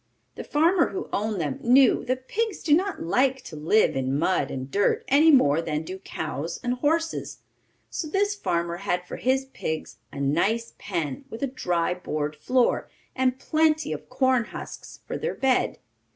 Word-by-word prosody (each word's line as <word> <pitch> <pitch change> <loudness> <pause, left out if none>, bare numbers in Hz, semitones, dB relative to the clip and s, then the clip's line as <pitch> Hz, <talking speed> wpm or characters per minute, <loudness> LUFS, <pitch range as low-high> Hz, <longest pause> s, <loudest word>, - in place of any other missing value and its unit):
The - - -7
farmer 335 +4 +3
who 385 - -5
owned 210 -1 -1
them 145 -5 -2
knew 255 +1 +5
that 255 +1 -2
pigs 445 -2 -2
do 300 - +3
not 380 +4 +1
like 255 +9 +1
to 155 - -9
live 160 +9 +3
in 135 +1 0
mud 160 -3 +1
and 130 0 -5
dirt 205 0 +1
any 295 +4 +5
more 165 - +5
than 155 -1 -2
do 185 +4 -7
cows 160 -3 -5
and 245 0 0
horses, 320 +5 -1 0.5
so 320 - -3
this 405 +5 +1
farmer 170 - -1
had 180 -2 -2
for - - -7
his 265 +1 +1
pigs 160 0 -4
a - - -7
nice 185 +12 0
pen, 165 -9 -3
with 225 - -6
a - - +2
dry 175 -7 0
board 155 -4 -3
floor, 250 +11 +1 0.3
and 260 -1 +1
plenty 310 +1 +1
of - - -8
corn 255 -2 +2
husks - - -9
for - - -4
their 475 - -2
bed. 265 -2 +1
230 Hz, 175 wpm, -25 LUFS, 165-275 Hz, 0.5 s, knew